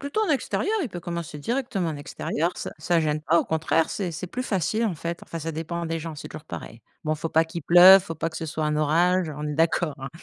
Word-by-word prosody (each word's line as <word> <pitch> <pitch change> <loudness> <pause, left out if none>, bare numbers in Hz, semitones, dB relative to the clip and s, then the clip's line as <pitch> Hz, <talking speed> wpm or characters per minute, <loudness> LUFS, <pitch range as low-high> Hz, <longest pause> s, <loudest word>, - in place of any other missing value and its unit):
plutôt 285 +10 -1
en 425 - 0
extérieur, 315 +8 0
il 265 - -2
peut 180 - -7
commencer 170 -3 -5
directement 225 - -1
en 150 - -5
extérieur, 155 +3 -2
ça - - -5
ça 170 +2 +1
gêne 155 -1 0
pas, 170 +2 +3
au - - +1
contraire, 160 0 +1
c'est 185 -4 -3
c'est 165 +3 -5
plus 250 +8 -4
facile, 215 +1 0
en 180 -7 -2
fait. 170 +2 -5
Enfin, 165 - -6
ça 165 +1 -4
dépend 170 +2 -4
des 165 0 -2
gens, 160 -1 -6
c'est - - -8
toujours 155 -1 -9
pareil. 115 - -8 0.2
Bon, 155 - +1
il - - -10
faut 165 - -3
pas 160 +1 +3
qu'il 170 0 -7
pleuve, 180 +4 +9
il - - -15
faut 165 - -5
pas 165 - -1
que 160 - -9
ce - - -4
soit 155 0 -3
un 150 0 0
orage, 170 +3 +2
on 150 0 -4
est 150 - -3
d'accord, 160 0 +1
hein. 135 0 -6
165 Hz, 275 wpm, -25 LUFS, 155-180 Hz, 0.2 s, pleuve